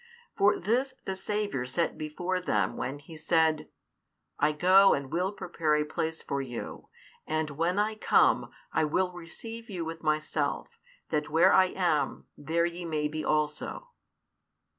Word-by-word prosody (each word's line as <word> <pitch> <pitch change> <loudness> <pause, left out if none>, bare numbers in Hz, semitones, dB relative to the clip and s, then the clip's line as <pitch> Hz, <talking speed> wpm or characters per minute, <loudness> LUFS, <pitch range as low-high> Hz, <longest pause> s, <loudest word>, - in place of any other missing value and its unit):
For 205 +1 +3
this 255 +7 0
the 190 - -2
Saviour 195 -9 -2
set 165 +7 0
before 175 +4 -3
them 105 - 0
when 135 +3 -3
He 145 +3 -13
said, 160 0 +1 0.7
I 150 +1 +3
go 185 +5 +6
and 140 -1 -5
will 185 +3 0
prepare 165 -6 -1
a 150 0 +1
place 160 +1 -3
for 140 0 -2
you; 120 -3 -7 0.4
and 155 -1 -1
when 165 +6 0
I 210 +1 +2
come, 215 - +3 0.2
I 160 - +2
will 180 +4 +1
receive 225 +7 -9
you 175 -5 -4
with 165 0 -6
Myself; 155 -1 -1 0.3
that 150 -1 0
where 165 +5 +5
I 190 - +7
am, 180 -5 0
there 165 +3 0
ye 175 +1 -4
may 155 -3 -1
be 155 0 -4
also. 150 - -1
165 Hz, 155 wpm, -29 LUFS, 150-185 Hz, 0.7 s, I